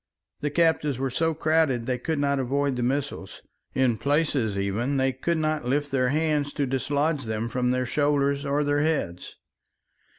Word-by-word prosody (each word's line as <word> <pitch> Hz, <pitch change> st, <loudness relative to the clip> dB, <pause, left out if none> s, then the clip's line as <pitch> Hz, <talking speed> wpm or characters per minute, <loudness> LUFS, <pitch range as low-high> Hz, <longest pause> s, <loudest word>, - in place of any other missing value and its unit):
The 145 Hz, -, -1 dB
captives 150 Hz, -3 st, +2 dB
were 135 Hz, 0 st, -2 dB
so 165 Hz, +4 st, 0 dB
crowded 155 Hz, -6 st, +1 dB
they 125 Hz, 0 st, -1 dB
could 160 Hz, +5 st, -2 dB
not 140 Hz, -1 st, +1 dB
avoid 140 Hz, +1 st, 0 dB
the 125 Hz, -, -2 dB
missiles; 130 Hz, -5 st, -3 dB, 0.3 s
in 125 Hz, -5 st, +2 dB
places, 140 Hz, -6 st, +1 dB
even, 110 Hz, +8 st, -1 dB
they 135 Hz, 0 st, +2 dB
could 165 Hz, +6 st, -1 dB
not 155 Hz, -3 st, -1 dB
lift 145 Hz, +3 st, 0 dB
their 130 Hz, -2 st, +2 dB
hands 150 Hz, -1 st, 0 dB
to 145 Hz, -, 0 dB
dislodge 140 Hz, +2 st, 0 dB
them 110 Hz, +1 st, -2 dB
from 125 Hz, +1 st, -1 dB
their 125 Hz, 0 st, +1 dB
shoulders 140 Hz, +1 st, +1 dB
or 145 Hz, +1 st, 0 dB
their 145 Hz, 0 st, +1 dB
heads. 145 Hz, -, -2 dB
140 Hz, 170 wpm, -26 LUFS, 125-150 Hz, 0.3 s, captives